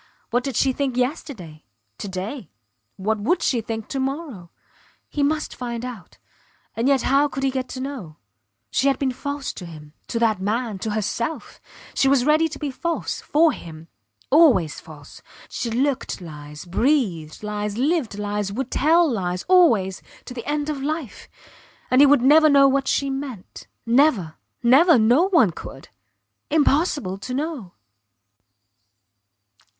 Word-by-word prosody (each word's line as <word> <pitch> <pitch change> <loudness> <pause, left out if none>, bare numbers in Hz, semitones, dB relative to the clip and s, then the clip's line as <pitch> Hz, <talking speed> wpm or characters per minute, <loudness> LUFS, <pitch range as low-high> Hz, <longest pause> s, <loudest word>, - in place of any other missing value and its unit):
What 245 +2 +1
did 270 -3 -4
she 265 +2 +2
think 265 -2 -2
yesterday 250 - -4 0.4
to - - -5
day; 190 - -6 0.5
what 215 +3 -1
would 335 - 0
she 240 -3 +1
think 225 -1 -5
to 270 - -3
morrow? 265 - -4 0.6
He 295 - -3
must 300 +1 0
find 240 -1 -5
out.... 240 -7 -9 0.6
And 230 +3 0
yet 275 -3 +3
how 280 +2 +3
could 270 -1 -5
he 270 - +2
get 260 -1 -3
to 255 - -6
know? 255 - -6 0.5
She 275 - +1
had 275 - +2
been 270 -2 0
false 285 +2 -5
to - - -9
him, 150 -2 -12
to - - -3
that 220 -4 +1
man, 215 0 -2
to 220 - -3
herself; 230 +7 -3 0.3
she 270 - +2
was 265 -2 +3
ready 310 +2 +4
to 290 - -8
be 290 -1 -4
false 335 +5 -3
for 315 +2 +3
him. 165 - -10 0.4
Always 260 - +4
false. 150 -3 -14 0.3
She 235 - -3
looked 260 +4 -1
lies, 150 -2 -10
breathed 185 - 0
lies, 210 0 -3
lived 275 -5 0
lies 205 -1 -2
would 260 +5 -4
tell 330 +4 +4
lies 180 -8 -2
always 235 - +3 0.2
to - - -8
the 240 -2 -8
end 295 0 -1
of 295 -3 -3
life! 300 -3 -4 0.6
And 255 +2 +6
he 290 - +8
would 275 -3 +4
never 310 +3 +6
know 280 -1 +6
what 270 0 +1
she 275 -1 0
meant. 270 -8 -7 0.2
Never! 235 - +3 0.3
Never! 290 +7 +6
No 245 - +4
one 315 - +4
could. - - -10 0.6
Impossible 290 - +1
to 250 +5 -5
know. 280 - -4
255 Hz, 155 wpm, -22 LUFS, 205-285 Hz, 0.6 s, he